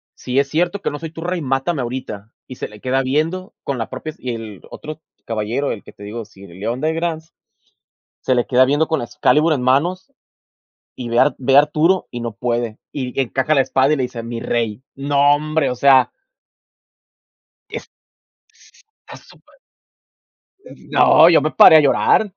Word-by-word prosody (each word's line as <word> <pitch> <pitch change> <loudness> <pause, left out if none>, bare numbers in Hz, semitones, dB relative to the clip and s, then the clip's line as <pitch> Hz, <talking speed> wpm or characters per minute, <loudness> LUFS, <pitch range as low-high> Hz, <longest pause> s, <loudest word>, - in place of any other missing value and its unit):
si 125 +1 -4
es 140 - +1
cierto 175 +6 -1
que - - -2
no 145 - -6
soy 165 -1 -7
tu 165 - -9
rey, 175 0 -3
mátame 135 +3 -1
ahorita". 120 -4 -6 0.2
Y 130 - -9
se - - -5
le 105 - -15
queda 130 +1 0
viendo 165 - -2
con 140 - -3
la 115 - -4
propias, 155 +5 -7
y 125 -2 -4
el 110 -4 -9
otro 155 +1 -9 0.2
caballero, 115 +5 -2
el 105 - -6
que - - -14
te 105 - -14
digo, 110 +2 -6
sir 100 -2 -16
Leodegrance, 155 - -3 0.9
se 130 - 0
le 120 -4 0
queda 125 +3 +4
viendo 145 +4 +1
con 160 -2 0
la 120 - -5
excalibur 150 +3 +2
en 130 - -3
manos, 175 - 0 0.8
y 120 -2 -6
ve 120 - +1
a - - +7
Ar 145 - 0
ve 135 +1 +1
a - - +11
Arturo 155 +5 +1
y 120 -1 -6
no 115 - -4
puede. 120 -1 -3
Y 130 -2 -4
encaja 135 +4 0
la 135 - +5
espada 135 +2 +2
y 150 - 0
le 130 - -1
dice: 120 -2 -5
"Mi 115 0 -5
rey". 115 -1 -2
No 145 +1 +3
hombre, 155 -1 -1
o - - -4
sea. 130 0 +4 1.6
Es - - -6
s - - -30 1.2
tá - - -11
súper - - -21 1.1
Mm, - - -16
no, 160 +2 +6
yo 170 - +5
me 155 +2 -1
paré 160 - +8
a - - +8
llorar. 185 +7 +2
135 Hz, 190 wpm, -19 LUFS, 120-155 Hz, 1.6 s, a